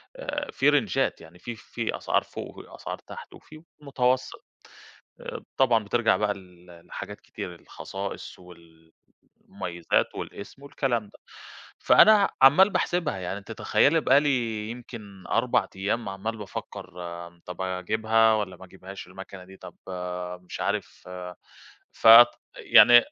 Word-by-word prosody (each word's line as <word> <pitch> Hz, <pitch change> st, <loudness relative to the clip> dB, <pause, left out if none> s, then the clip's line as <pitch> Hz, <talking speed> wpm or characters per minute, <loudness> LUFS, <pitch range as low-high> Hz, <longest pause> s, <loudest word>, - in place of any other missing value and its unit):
آآ 295 Hz, -13 st, -5 dB
في 135 Hz, +2 st, +3 dB
رينجات 135 Hz, -11 st, +1 dB
يعني 80 Hz, +2 st, -15 dB
فيه 120 Hz, +4 st, -7 dB
فيه 105 Hz, -, -5 dB
أسعار -, -, 0 dB
فوق -, -, -9 dB
وفي -, -, -12 dB
أسعار -, -, -6 dB
تحت، -, -, -10 dB
وفي 155 Hz, +1 st, -15 dB, 0.2 s
متوسط، 130 Hz, -2 st, -1 dB, 0.8 s
آآ -, -, -7 dB
طبعًا 120 Hz, -5 st, +3 dB
بترجع 115 Hz, +2 st, +2 dB
بقى 105 Hz, -1 st, 0 dB
ل 90 Hz, -2 st, -16 dB
ل 85 Hz, -1 st, -16 dB
لحاجات -, -, -8 dB
كتير 90 Hz, -, -8 dB
الخصائص 95 Hz, +3 st, -8 dB
وال 85 Hz, -2 st, -18 dB, 0.6 s
المميزات 90 Hz, -3 st, -1 dB
والاسم 120 Hz, +7 st, -8 dB
والكلام 130 Hz, -5 st, -1 dB
ده. 100 Hz, -, -18 dB, 0.6 s
فأنا 210 Hz, -2 st, +6 dB
عمّال 150 Hz, +10 st, +7 dB
باحسبها 175 Hz, -, -1 dB
يعني 95 Hz, +2 st, -4 dB
أنتِ 100 Hz, -, -10 dB
تخيّلي 160 Hz, +3 st, +2 dB
بقى 140 Hz, -1 st, +5 dB
لي 115 Hz, -7 st, -1 dB
يمكن 110 Hz, -5 st, -10 dB
4 -, -, +1 dB
أيام 100 Hz, +3 st, -2 dB
عمّال 100 Hz, +4 st, -4 dB
بافكر 95 Hz, -2 st, -8 dB
آآ 85 Hz, 0 st, -9 dB
طَب 90 Hz, 0 st, -8 dB
أجيبها 110 Hz, +5 st, +2 dB
والّا 100 Hz, -4 st, -3 dB
ما 95 Hz, -, -13 dB
أجيبهاش 95 Hz, +1 st, -11 dB
المكنة 95 Hz, 0 st, -11 dB
دي؟ 95 Hz, +1 st, -15 dB
طَب -, -, -12 dB
آآ 90 Hz, -1 st, -5 dB
مش 90 Hz, 0 st, -9 dB
عارف -, -, -3 dB
آآ 90 Hz, -1 st, -8 dB, 0.6 s
فت 115 Hz, +2 st, +9 dB, 0.3 s
يعني 120 Hz, 0 st, +7 dB
100 Hz, 145 wpm, -26 LUFS, 90-120 Hz, 0.8 s, فت